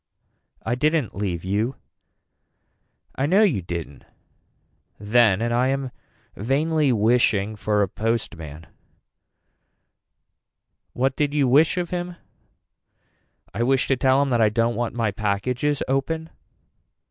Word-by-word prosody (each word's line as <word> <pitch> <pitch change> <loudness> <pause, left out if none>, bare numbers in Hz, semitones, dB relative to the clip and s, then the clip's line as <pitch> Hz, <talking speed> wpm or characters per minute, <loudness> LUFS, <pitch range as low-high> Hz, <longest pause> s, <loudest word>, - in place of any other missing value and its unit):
I 115 - 0
didn't 150 0 0
leave 90 -4 -3
you. 105 +7 -1 1.4
I 135 - -1
know 195 +7 +4
you 155 - +2
didn't 85 -5 -6 0.9
then 110 -1 +3
and 120 0 -1
I 125 +2 +2
am 135 -1 -2 0.4
vainly 145 +5 +1
wishing 110 -2 +2
for 105 0 +1
a - - 0
postman. 85 -8 -4 2.3
What 130 +1 0
did 145 -1 -1
you 140 -3 +3
wish 150 +7 +4
of 175 -2 -2
him. 175 0 -4 1.4
I - - -3
wish 130 +2 +2
to 135 - +3
tell 130 +2 +3
him 140 - -2
that 120 -2 +2
I 110 - +5
don't 115 +2 +1
want 120 0 -3
my 115 -3 0
packages 115 +8 -1
open. 160 +5 -2
120 Hz, 125 wpm, -23 LUFS, 105-140 Hz, 2.3 s, I